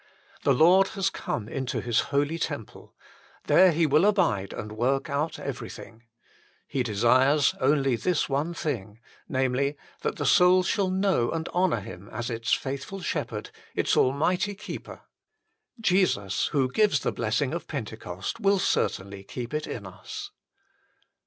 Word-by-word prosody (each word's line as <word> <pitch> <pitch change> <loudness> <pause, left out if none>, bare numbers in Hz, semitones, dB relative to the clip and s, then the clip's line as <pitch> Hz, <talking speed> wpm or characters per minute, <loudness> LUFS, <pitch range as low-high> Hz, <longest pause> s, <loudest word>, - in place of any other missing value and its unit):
The - - +3
Lord 185 +5 +6
has 195 0 +1
come 105 - -4
into 130 +1 -3
His 120 -2 +1
holy 145 +3 0
temple. 145 -10 -6 0.5
There 185 -1 +6
He 165 +1 +2
will 150 +3 +4
abide 105 - +2
and 105 - -6
work 135 +6 0
out 150 +3 -1
everything. 110 +1 -7 0.7
He 135 - -1
desires 130 +6 +3
only 135 -1 +3
this 175 +7 0
one 150 +5 -1
thing 115 -10 -4 0.3
namely, 135 +1 0 0.2
that - - -1
the - - -3
soul 180 +1 +5
shall 195 0 +1
know 190 -10 +1
and 160 0 -3
honour 175 - +1
Him 95 +2 -10
as 120 +1 -4
its 115 -1 -3
faithful 140 +8 -2
Shepherd, 125 -11 -3 0.2
its - - +1
Almighty 175 +9 +2
Keeper. 205 +1 -8 0.8
Jesus, 180 - +1
who 135 -3 0
gives 210 +7 +3
the - - 0
bless - - -1
ing - - -1
of - - -4
Pentecost, - - -5
will 200 0 +3
certainly 100 - -1
keep 120 +5 -7
it 150 0 -2
in 105 - -6
us. 95 -1 -8
140 Hz, 145 wpm, -27 LUFS, 120-180 Hz, 0.8 s, Lord